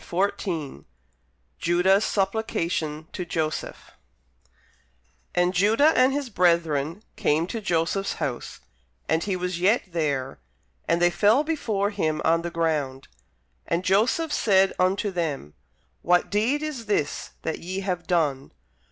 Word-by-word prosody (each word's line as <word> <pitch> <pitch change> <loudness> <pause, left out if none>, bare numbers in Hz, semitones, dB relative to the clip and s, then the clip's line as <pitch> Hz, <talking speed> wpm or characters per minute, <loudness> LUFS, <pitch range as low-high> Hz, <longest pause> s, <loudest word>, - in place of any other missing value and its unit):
Tennyson 170 - -2 0.7
JUDAH'S 185 +4 +3
SUPPLICATION 170 -6 -1
TO 180 - -3
JOSEPH 160 -2 -4 1.4
And 180 +1 +2
Judah 225 - +4
and 255 +1 +5
his 275 -3 -3
brethren 170 -1 +1
came 155 +3 +1
to 225 +5 -5
Joseph's 185 +1 0
house; 125 -3 -5 0.5
and 160 +1 +1
he 195 -2 -1
was 180 -1 -3
yet 205 +7 +3
there: 140 - -2 0.5
and 170 - +2
they 175 0 +4
fell 215 +10 +4
before 220 -11 -1
him 155 -7 -1
on 165 +1 +3
the 170 - -4
ground. 155 -6 -2 0.6
And 175 +2 -1
Joseph 240 - +2
said 195 -2 +3
unto 195 +3 +1
them, 155 - -3 0.5
What 180 0 +2
deed 240 +9 +1
is 270 -8 -5
this 155 -8 -1
that 160 - -3
ye 185 +3 -4
have 180 -3 -3
done? 150 -6 0
180 Hz, 125 wpm, -25 LUFS, 160-205 Hz, 1.4 s, and